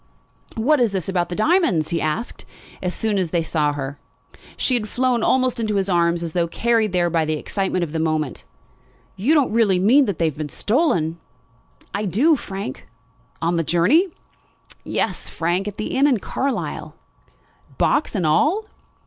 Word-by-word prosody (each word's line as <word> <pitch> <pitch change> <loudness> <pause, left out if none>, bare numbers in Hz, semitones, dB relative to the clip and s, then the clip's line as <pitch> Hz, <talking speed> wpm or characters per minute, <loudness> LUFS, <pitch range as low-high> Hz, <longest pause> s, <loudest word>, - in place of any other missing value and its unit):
"What 270 +7 +2
is 235 -5 +2
this 185 -4 -2
about 180 -2 0
the 175 - -4
diamonds?" 215 - +2
he 170 - 0
asked 155 +10 -3 0.4
as 180 -1 -2
soon 215 -3 0
as 180 -3 -1
he 170 0 0
saw 155 -2 0
her. 140 0 -5 0.6
She 260 - +1
had 220 -4 0
flown 250 -1 +1
almost 255 +1 +2
into 215 -2 -1
his 195 0 0
arms 170 -1 +2
as 165 -2 -5
though 170 -1 +1
carried 225 +3 +1
there 175 -2 +1
by 165 -1 +2
the 155 0 -1
excitement 190 +2 -1
of 160 - -4
the 160 - -2
moment. 155 -3 -1 0.7
"You 235 +12 +2
don't 290 -4 +3
really 215 -5 +3
mean 240 +10 +5
that 200 -7 -2
they 165 - +1
have 155 -2 -2
been 150 -1 -3
stolen?" 175 - 0 0.7
"I 205 +1 -2
do, 260 - +3
Frank." 195 - -6 0.6
"On 170 +1 +1
the 165 - +1
journey?" 180 - +3 0.8
"Yes, - - -2
Frank; 175 +4 -1
at 205 - -6
the 215 - -3
inn 275 +2 +4
at 255 -6 +2
Carlisle." 270 +6 -3 0.8
"Box 290 -5 +1
and 185 -5 0
all?" 310 - +2
190 Hz, 175 wpm, -21 LUFS, 165-235 Hz, 0.8 s, mean